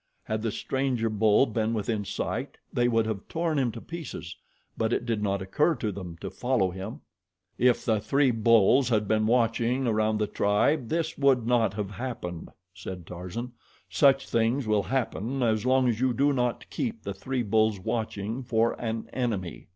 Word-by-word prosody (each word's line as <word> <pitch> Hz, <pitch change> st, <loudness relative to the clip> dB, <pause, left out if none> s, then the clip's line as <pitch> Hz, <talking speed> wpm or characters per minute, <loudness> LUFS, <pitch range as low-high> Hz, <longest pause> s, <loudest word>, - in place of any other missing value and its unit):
Had 110 Hz, 0 st, -2 dB
the 115 Hz, -1 st, -1 dB
stranger 130 Hz, -4 st, -1 dB
bull 110 Hz, +3 st, +4 dB
been 110 Hz, -1 st, -1 dB
within 105 Hz, -1 st, -2 dB
sight -, -, -3 dB, 0.2 s
they 120 Hz, 0 st, +2 dB
would 115 Hz, -2 st, +2 dB
have 110 Hz, -3 st, -4 dB
torn 160 Hz, -3 st, -1 dB
him 125 Hz, -3 st, +1 dB
to 115 Hz, -, -7 dB
pieces; 130 Hz, -, -7 dB, 0.4 s
but 110 Hz, 0 st, 0 dB
it -, -, -1 dB
did 115 Hz, -3 st, -1 dB
not 100 Hz, -2 st, -1 dB
occur 150 Hz, -, +2 dB
to 110 Hz, -4 st, -2 dB
them 90 Hz, -3 st, -7 dB
to -, -, -5 dB
follow 120 Hz, -7 st, 0 dB
him. 95 Hz, +4 st, -7 dB, 0.6 s
"If 125 Hz, -1 st, +3 dB
the 110 Hz, -2 st, +2 dB
three 135 Hz, +5 st, +2 dB
bulls 115 Hz, +2 st, +4 dB
had 105 Hz, -3 st, +1 dB
been 110 Hz, 0 st, +2 dB
watching 120 Hz, +2 st, +2 dB
around 110 Hz, -1 st, +1 dB
the 105 Hz, -, +1 dB
tribe 110 Hz, +7 st, +1 dB
this 160 Hz, -2 st, -1 dB
would 135 Hz, -4 st, +3 dB
not 115 Hz, -4 st, +2 dB
have 105 Hz, -1 st, -3 dB
happened," 95 Hz, -7 st, -5 dB, 0.2 s
said 95 Hz, -2 st, -8 dB
Tarzan. 90 Hz, +9 st, -6 dB, 0.4 s
"Such 135 Hz, -2 st, +4 dB
things 115 Hz, +3 st, +1 dB
will 105 Hz, -1 st, +2 dB
happen 130 Hz, +1 st, -2 dB
as 110 Hz, 0 st, +1 dB
long 130 Hz, 0 st, +4 dB
as 115 Hz, -2 st, 0 dB
you 130 Hz, 0 st, +2 dB
do 140 Hz, +3 st, +2 dB
not 125 Hz, -2 st, -1 dB
keep 230 Hz, -3 st, -3 dB
the 100 Hz, -, -4 dB
three 125 Hz, +6 st, -3 dB
bulls 110 Hz, -1 st, +2 dB
watching 110 Hz, +3 st, -3 dB
for 115 Hz, -2 st, +1 dB
an 115 Hz, -1 st, -3 dB
enemy. 110 Hz, -9 st, -3 dB
115 Hz, 180 wpm, -27 LUFS, 105-125 Hz, 0.6 s, bull